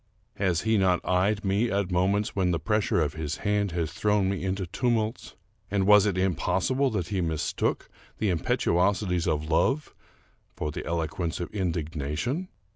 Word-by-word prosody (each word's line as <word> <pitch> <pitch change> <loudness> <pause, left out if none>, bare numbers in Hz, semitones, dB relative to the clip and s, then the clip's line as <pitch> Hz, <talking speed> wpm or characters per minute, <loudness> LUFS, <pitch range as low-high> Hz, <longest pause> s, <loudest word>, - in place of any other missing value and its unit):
Has 90 -4 +1
he 110 -1 +2
not 90 -2 +3
eyed 100 +3 +1
me 100 +5 +1
at 100 -2 -1
moments 95 +4 +1
when 95 -2 +1
the 85 - +1
pressure 105 -4 +1
of 75 -2 0
his 80 0 -4
hand 105 -2 +1
has 85 -2 -2
thrown 105 -2 +1
me 95 - -3
into 95 0 -1
tumults, 115 +4 -1 0.3
and 100 -1 +1
was 105 0 +6
it 95 -3 0
impossible 95 - +1
that 100 -7 -3
he 95 -2 -1
mistook 80 -3 -1 0.3
the 105 -3 +1
impetuosities 90 +1 +1
of 75 -2 0
love 135 - +1 0.6
for 75 - -3
the - - -5
eloquence 80 0 -2
of 85 - -4
indignation? 85 - -2
95 Hz, 160 wpm, -27 LUFS, 85-105 Hz, 0.6 s, was